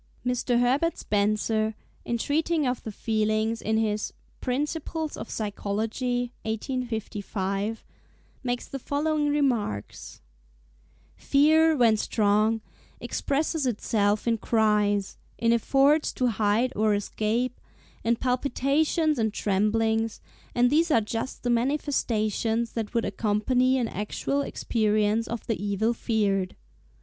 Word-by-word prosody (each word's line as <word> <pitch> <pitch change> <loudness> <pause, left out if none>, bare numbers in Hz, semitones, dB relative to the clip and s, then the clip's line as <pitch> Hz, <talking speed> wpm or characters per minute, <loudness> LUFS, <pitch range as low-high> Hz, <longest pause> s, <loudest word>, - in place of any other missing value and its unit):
Mr. 250 -1 +1
Herbert 270 +7 +2
Spencer, 215 +1 0 0.3
in 235 - -1
treating 310 +4 0
of 250 -1 -1
the 220 - -6
Feelings 215 +1 0
in 220 0 0
his 215 -1 -1 0.3
'Principles 300 +4 -2
of - - -7
Psychology' 225 +4 -2
(1855), 220 -3 -3 0.6
makes 245 -1 -2
the 275 - -6
following 295 +2 0
remarks:—"Fear, 205 - -1
when 230 -3 +4
strong, 215 +1 +2 0.4
expresses 295 0 -1
itself 210 -2 0
in 230 -1 +2
cries, 210 -3 +1 0.2
in 230 0 +3
efforts 275 +6 +3
to 250 -1 +1
hide 220 +4 +1
or 215 0 +2
escape, 220 +4 -1 0.4
in 235 +1 +2
palpitations 280 +5 +1
and 220 -1 +1
tremblings; 220 +2 0 0.4
and 245 +1 +4
these 330 +3 +3
are 265 - +5
just 225 +4 -4
the 245 - +1
manifestations 235 -4 0
that 225 0 -4
would 230 - +2
accompany 225 +6 +1
an 245 -3 0
actual 215 +8 -2
experience 215 -3 0
of 235 -1 -5
the 225 -3 -2
evil 205 +3 +1
feared. 205 -5 0
225 Hz, 110 wpm, -26 LUFS, 210-255 Hz, 0.6 s, are